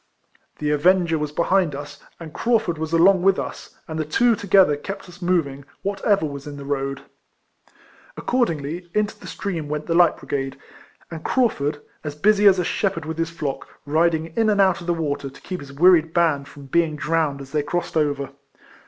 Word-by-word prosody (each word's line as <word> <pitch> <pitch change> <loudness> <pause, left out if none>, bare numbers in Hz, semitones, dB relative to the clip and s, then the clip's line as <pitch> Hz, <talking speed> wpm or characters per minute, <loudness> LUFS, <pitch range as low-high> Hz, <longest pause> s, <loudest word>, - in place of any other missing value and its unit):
The 150 0 -1
avenger 170 +2 +3
was 150 -1 -3
behind 170 -1 +1
us, 145 0 -8 0.2
and 160 -3 -9
Craufurd 220 -9 0
was 160 0 -3
along 180 +3 +5
with 195 +1 +4
us, - - -7
and 160 0 -5
the - - +1
two 230 +10 +3
together 195 -7 +4
kept 195 +8 -7
us 180 +1 -14
moving, 160 -6 0 0.2
whatever 200 -2 +1
was 140 -1 -6
in 145 -1 -7
the 140 - -8
road. 135 -1 -3 1.1
Accordingly, 175 - -1
into 210 -1 0
the - - -11
stream 165 -7 -4
went 150 0 -3
the 165 - -1
light 170 -1 +4
brigade, 135 -1 -4 0.5
and 160 -1 -7
Craufurd, 150 - 0 0.2
as 150 -2 -5
busy 205 +5 +4
as 190 -1 +6
a 180 - +1
shepherd 190 -5 -1
with 160 +1 -5
his 165 0 0
flock, 150 -5 -4 0.2
riding 160 +1 +1
in 225 -1 +2
and 205 -1 +2
out 190 -3 +3
of 170 - -9
the 175 - +2
water, 145 -4 -2
to 140 +1 -16
keep 185 -1 -5
his 140 -1 -10
wearied 165 +2 +4
band 155 -5 +2
from 140 -1 -13
being 160 +2 +1
drowned 150 -2 0
as 135 -1 -10
they 150 - +1
crossed 175 +4 -3
over. 145 -3 0
165 Hz, 190 wpm, -22 LUFS, 145-185 Hz, 1.1 s, as